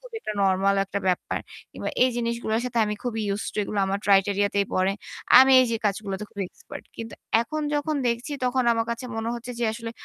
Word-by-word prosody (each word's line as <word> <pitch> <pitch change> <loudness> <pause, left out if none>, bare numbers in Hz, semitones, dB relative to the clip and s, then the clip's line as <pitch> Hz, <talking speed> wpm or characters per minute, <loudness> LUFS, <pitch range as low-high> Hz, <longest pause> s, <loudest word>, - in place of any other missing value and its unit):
খুবই - - -10
একটা 215 - -4
নরমাল 195 +1 +3
একটা 195 +1 -3
ব্যাপার। 180 - 0 0.3
কিংবা - - -4
এই 255 - +4
জিনিসগুলোর 235 -1 -1
সাথে 245 -2 -2
আমি 210 0 -2
খুবই 235 -3 -2
ইউস 200 +1 -1
টু - - -12
এগুলো 205 0 -4
আমার 195 +1 -1
ক্রাইটেরিয়া 200 0 +4
তেই 200 -1 +2
পড়ে। 185 +1 +2 0.5
আমি 265 +1 +7
এইযে 235 -3 +1
কাজগুলোতে 200 -1 -2
খুবই 200 - -4
এক্সপার্ট। - - -11
কিন্তু 225 -1 -7 0.3
এখন 305 +6 -3
যখন 295 +1 0
দেখছি 235 +5 -1
তখন 250 0 +1
আমার 230 0 0
কাছে 235 +2 -4
মনে 225 +1 -2
হচ্ছে 240 +1 -7
যে - - +1
আসলে 230 0 -6
225 Hz, 205 wpm, -25 LUFS, 200-245 Hz, 0.5 s, আমি